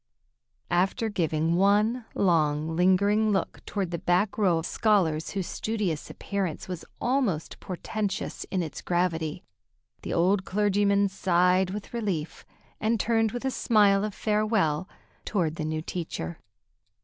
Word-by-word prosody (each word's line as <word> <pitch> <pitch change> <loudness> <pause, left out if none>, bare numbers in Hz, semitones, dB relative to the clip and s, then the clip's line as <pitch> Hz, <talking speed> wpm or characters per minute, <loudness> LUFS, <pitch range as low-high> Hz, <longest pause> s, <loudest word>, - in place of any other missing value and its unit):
After 190 +6 +1
giving 165 -3 0
one 210 +5 +3
long, 160 -3 +2
lingering 200 +5 +3
look 195 - -2
toward 195 -4 -2
the 170 - -3
back 180 +5 +1
row 185 -6 +3
of 165 - -3
scholars 175 -8 +1
whose 195 -3 -3
studious 205 -9 -2
appearance 195 -6 -3
was 180 -2 -5 0.2
almost 240 - 0
portentous 200 +2 -4
in 185 -2 -1
its 155 - -6
gravity, 175 -2 -1 0.6
the - - -5
old 185 +3 +2
clergyman 200 0 +2
sighed 185 -1 +2
with 205 +4 -6
relief 195 -9 -3 0.4
and 220 +1 +1
turned 225 -1 +2
with 245 +3 -5
a 265 - +1
smile 205 -5 +3
of 215 -2 -3
farewell 210 -6 +1 0.3
toward 170 -6 -1
the 155 - -2
new 155 0 -2
teacher. 160 - -5
190 Hz, 135 wpm, -27 LUFS, 170-210 Hz, 0.6 s, one